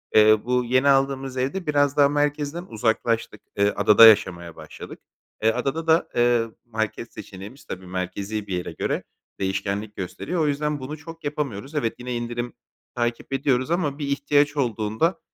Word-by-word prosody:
eee, 110 0 +7
bu 125 0 +1
yeni 130 +3 +2
aldığımız 135 -1 +1
evde 140 +8 -2
biraz 145 -1 +2
daha 140 -1 +6
merkezden 145 +3 -1
uzaklaştık. 115 - -1 0.2
Eee, 100 0 +4
adada 105 +2 +7
yaşamaya 85 -6 +3
başladık. - - -10 0.4
Eee, 110 - +5
adada 135 +7 -2
da, 160 +1 +3
eee, 120 -1 +3 0.2
market 110 0 -4
seçeneğimiz, 100 +8 -10
tabii, 95 0 -7
merkezi 95 +3 -4
bir 90 - -2
yere 90 - -4
göre - - -2 0.4
değişkenlik 100 +2 -2
gösteriyor. 150 - -3
O 155 - +2
yüzden 150 +1 -1
bunu 140 +4 -6
çok 165 +2 -11
yapamıyoruz. 140 -3 -4
Evet, 115 -7 0
yine 125 0 -4
indirim 120 0 -4 0.4
takip 120 +2 -2
ediyoruz 135 0 +1
ama 160 -5 0
bir 145 - -3
ihtiyaç 145 +1 +2
olduğunda, 115 - 0
125 Hz, 155 wpm, -24 LUFS, 110-145 Hz, 0.4 s, eee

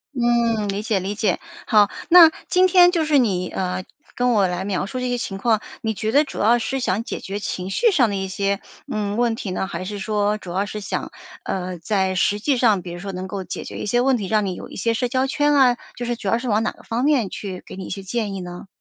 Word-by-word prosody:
嗯， 235 -3 +2
理 200 +1 -2
解 215 -3 0
理 195 +3 -3
解。 215 0 0 0.3
好， 210 -3 +5 0.2
那 335 -2 +9 0.2
今 370 0 +5
天 355 -1 +6
就 330 -3 +1
是 300 -2 +3
你， 185 -8 +1
呃， 185 0 -3 0.3
跟 245 0 +2
我 200 -4 +3
来 180 +1 -3
描 195 -1 -1
述 255 +4 -5
这 250 0 -2
些 245 - 0
情 195 -4 -4
况， 220 0 +2 0.2
你 220 -1 -1
觉 215 +2 -2
得 290 +4 +5
主 280 - -8
要 235 +3 +4
是 265 +4 -2
想 220 -2 0
解 - - -5
决 200 +2 -5
情 185 -1 -4
绪 460 - +3
上 250 - +3
的 200 - -2
一 190 0 -2
些， 200 +1 -1 0.3
嗯， 210 0 -2
问 235 -2 +2
题 195 -4 -5
呢？ 190 - -2
还 - - -5
是 205 +1 -5
说， 210 +1 0
主 180 -4 -9
要 195 +2 0
是 210 +1 -6
想， 200 - -4 0.3
呃， 185 -1 -3
在 190 +1 0
实 205 +3 +1
际 270 +3 +1
上， 215 -6 +3
比 175 - -8
如 175 - -7
说 195 +1 -5
能 185 +1 -5
够 195 -1 -5
解 - - -6
决 - - -8
一 - - -4
些 240 +4 +2
问 260 -1 +3
题， 200 -3 -4
让 215 -1 +2
你 185 -2 -3
有 - - -9
一 - - -11
些 230 +4 0
社 245 +2 0
交 260 +2 0
圈 295 +1 +2
啊， 255 -4 +5 0.2
就 245 - -4
是 240 0 -1
主 205 - -7
要 230 - +3
是 250 -1 -4
往 215 +2 +2
哪 - - 0
个 - - -18
方 235 +2 -2
面 260 -10 +2
去 190 -3 -6
给 - - -9
你 190 - -6
一 - - -8
些 195 - -5
建 205 +1 -3
议 190 - -5
呢？ 180 +2 -8
210 Hz, 290 characters per minute, -22 LUFS, 195-245 Hz, 0.3 s, 那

